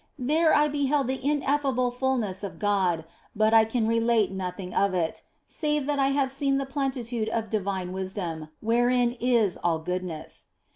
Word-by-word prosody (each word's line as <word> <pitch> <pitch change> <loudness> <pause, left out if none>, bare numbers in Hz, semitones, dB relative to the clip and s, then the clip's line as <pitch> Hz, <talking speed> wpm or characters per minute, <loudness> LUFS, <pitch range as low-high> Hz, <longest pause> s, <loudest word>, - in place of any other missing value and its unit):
There 310 +5 +2
I 300 0 +5
beheld 285 -1 +1
the 260 +1 -3
ineffable 275 -3 +1
fulness 245 -7 -1
of 200 - -6
God; 190 -6 +1 0.3
but 215 +1 +3
I 225 -1 +7
can 225 0 -1
relate 230 -2 +2
nothing 185 -1 -5
of 200 -2 +2
it, 165 -2 -1 0.2
save 300 -2 -1
that 290 0 -1
I 270 - +3
have 275 -1 +1
seen 275 0 +1
the 275 - -1
plenitude 255 -5 -2
of 225 -2 -3
divine 190 -3 -2
wisdom, 185 -5 -4
wherein 240 +2 +2
is 235 -6 +2
all 170 -2 0
goodness. 175 -1 -5
230 Hz, 160 wpm, -26 LUFS, 190-270 Hz, 0.3 s, I